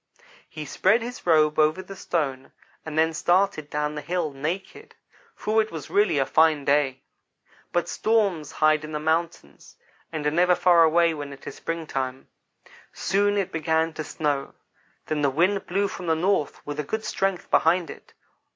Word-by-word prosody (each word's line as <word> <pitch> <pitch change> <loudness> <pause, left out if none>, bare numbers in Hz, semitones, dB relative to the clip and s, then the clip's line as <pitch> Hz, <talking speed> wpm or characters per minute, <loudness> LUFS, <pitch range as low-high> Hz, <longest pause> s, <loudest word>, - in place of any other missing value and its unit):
"He 155 -1 -7
spread 210 - +2
his 245 -5 -8
robe 155 -2 +4
over 155 +4 +2
the 195 +1 -10
stone, 140 -8 -3 0.3
and 155 -1 -6
then 160 +1 +3
started 175 -2 +1
down 150 0 -2
the 150 - -5
hill, 175 -3 -2
naked, 175 - -5 0.4
for 220 +1 +1
it 215 - -5
was 160 -4 -8
really 205 -6 +3
a 135 - +2
fine 155 -2 +3
day. 140 -2 +1 0.7
But 175 - 0
storms 200 -9 0
hide 155 0 +3
in 155 0 -7
the 150 - -2
mountains, 160 - -3 0.4
and 155 -2 -4
are 150 - +2
never 180 +3 +3
far 175 -2 +5
away 165 +1 +4
when 145 -2 -6
it 140 - -12
is - - -6
springtime. 135 -6 -4 0.6
Soon 205 +1 +1
it 190 -2 -1
began 160 0 0
to 155 - -5
snow 145 -2 -2 0.5
then 155 -1 -2
the 140 - +3
wind 180 +8 +1
blew 200 +3 0
from 180 -2 -7
the 160 - +3
north 175 -2 -1
with 145 0 -5
a - - 0
good 220 +9 -4
strength 195 -2 -2
behind 170 +1 +3
it. - - -14
160 Hz, 175 wpm, -25 LUFS, 150-185 Hz, 0.7 s, far